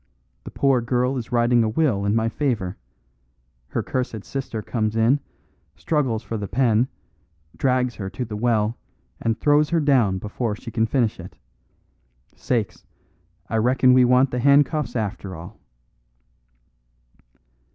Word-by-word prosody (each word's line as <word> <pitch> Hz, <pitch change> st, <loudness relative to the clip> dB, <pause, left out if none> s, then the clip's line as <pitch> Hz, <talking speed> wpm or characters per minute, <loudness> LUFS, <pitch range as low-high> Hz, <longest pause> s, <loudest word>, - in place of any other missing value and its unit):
The -, -, -6 dB
poor 135 Hz, -3 st, +2 dB
girl 125 Hz, +2 st, 0 dB
is 120 Hz, -3 st, -5 dB
writing 120 Hz, 0 st, +3 dB
a 110 Hz, -, 0 dB
will 110 Hz, -6 st, +1 dB
in 100 Hz, +2 st, +1 dB
my 115 Hz, 0 st, +1 dB
favour; 115 Hz, -8 st, -2 dB, 0.9 s
her -, -, -3 dB
cursed 120 Hz, -5 st, -3 dB
sister 130 Hz, -5 st, -5 dB
comes 110 Hz, -1 st, -2 dB
in, 115 Hz, +6 st, +3 dB, 0.6 s
struggles 130 Hz, -8 st, -1 dB
for 115 Hz, -, -4 dB
the 105 Hz, -1 st, -4 dB
pen, 115 Hz, +1 st, +2 dB, 0.7 s
drags 125 Hz, -2 st, +1 dB
her 95 Hz, -3 st, -6 dB
to 125 Hz, -, -5 dB
the 110 Hz, -2 st, -6 dB
well, 110 Hz, 0 st, 0 dB, 0.4 s
and 115 Hz, 0 st, -1 dB
throws 150 Hz, 0 st, +3 dB
her 170 Hz, -, +2 dB
down 130 Hz, -10 st, +3 dB
before 105 Hz, +3 st, -3 dB
she 115 Hz, +2 st, -9 dB
can 115 Hz, 0 st, +1 dB
finish 115 Hz, -3 st, 0 dB
it. 90 Hz, +1 st, -11 dB, 1.0 s
Sakes! 115 Hz, -5 st, -2 dB, 0.6 s
I 115 Hz, -, -1 dB
reckon 125 Hz, +3 st, +4 dB
we 130 Hz, 0 st, +6 dB
want 125 Hz, +2 st, +4 dB
the 125 Hz, -, -2 dB
handcuffs 140 Hz, +2 st, +3 dB
after 100 Hz, -4 st, -3 dB
all." 85 Hz, +6 st, -11 dB
120 Hz, 140 wpm, -23 LUFS, 110-130 Hz, 1.0 s, we